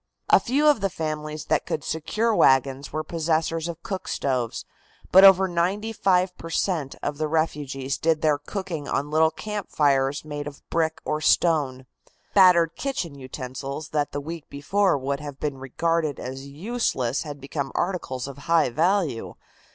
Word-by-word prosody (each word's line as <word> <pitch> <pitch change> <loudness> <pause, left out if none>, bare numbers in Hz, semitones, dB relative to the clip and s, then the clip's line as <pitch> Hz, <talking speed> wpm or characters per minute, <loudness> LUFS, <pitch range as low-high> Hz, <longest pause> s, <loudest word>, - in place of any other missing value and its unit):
A - - +8
few 275 +5 +1
of 290 -8 +4
the 195 - +1
families 155 -2 -4
that - - 0
could 150 - -2
secure 215 +9 -1
wagons 135 -1 +3
were 155 - -2
possessors 165 0 -1
of 170 -1 -7
cook 190 -2 -5
stoves, 125 -4 -2 0.5
but 190 +1 +8
over 190 -1 +8
95 185 +1 +1
per 165 - -7
cent. 165 -5 -1
of 145 0 -3
the 155 - 0
refugees 145 -4 -1
did 160 -1 +1
their 150 -2 +3
cooking 165 -2 -5
on 145 +2 -2
little 160 +1 +4
campfires 145 -8 0
made 145 -1 -5
of 145 -1 -11
brick 160 -1 0
or 155 0 -1
stone. 145 -7 +2 0.5
Battered 180 -4 +6
kitchen 265 - -3
utensils 135 +2 -6
that 150 -1 -1
the 145 - -3
week 160 +2 -7
before 180 +5 +1
would 140 +1 -2
have 145 -2 -8
been 140 -3 -3
regarded 155 +2 -1
as 135 +2 -6
useless 145 - -1
had 145 -3 -7
become 140 0 -4
articles 155 -9 -2
of 140 0 -9
high 165 -6 +4
value. 165 - 0
155 Hz, 160 wpm, -25 LUFS, 140-175 Hz, 0.5 s, A